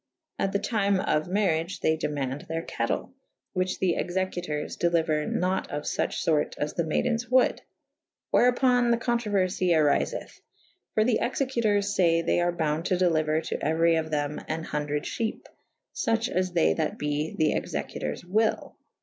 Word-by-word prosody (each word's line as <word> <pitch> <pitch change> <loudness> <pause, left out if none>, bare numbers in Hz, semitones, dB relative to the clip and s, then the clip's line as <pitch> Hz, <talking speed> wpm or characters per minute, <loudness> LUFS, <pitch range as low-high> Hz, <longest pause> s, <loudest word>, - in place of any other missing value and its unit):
At 195 - +1
the 200 - +1
tyme 200 -2 +1
of 155 -3 0
maryage 180 -3 0
they 160 - +3
demaunde 145 -3 -3
theyr 165 +1 -3
cattell 115 - -3 0.2
/ - - -60
whiche 185 0 0
the 180 -3 +1
executours 175 -4 -2
deliuer 165 -3 +1
nat 185 +1 0
of 145 0 -4
fuche - - -2
fort 155 -2 +1
as 150 0 -2
the 170 - 0
maydens 235 +9 -1
wold 255 0 +3 0.4
/ - - -55
wherupon 245 0 +4
the 235 - +3
co«trouerfy 205 -7 0
arifeth. 155 - 0 0.5
For 215 - +4
the 230 0 +2
executours 230 -6 0
fay 165 -2 +3
they - - +2
are 175 0 +2
bounde 160 -1 -1
to 185 - +2
delyuer 160 -3 +2
to - - -2
euery 165 +2 +2
of 160 0 -4
them 150 -1 -2
an 160 +1 -3
hundred 150 -1 -2
fhepe 225 -2 -3 0.3
/ - - -57
fuche 225 +1 0
as 185 0 -1
they 170 -2 +3
that 160 -2 -2
be 150 +1 -2
the 155 -1 +3
executours 75 - -4
wyll. 215 +5 0
175 Hz, 165 wpm, -27 LUFS, 155-205 Hz, 0.5 s, wherupon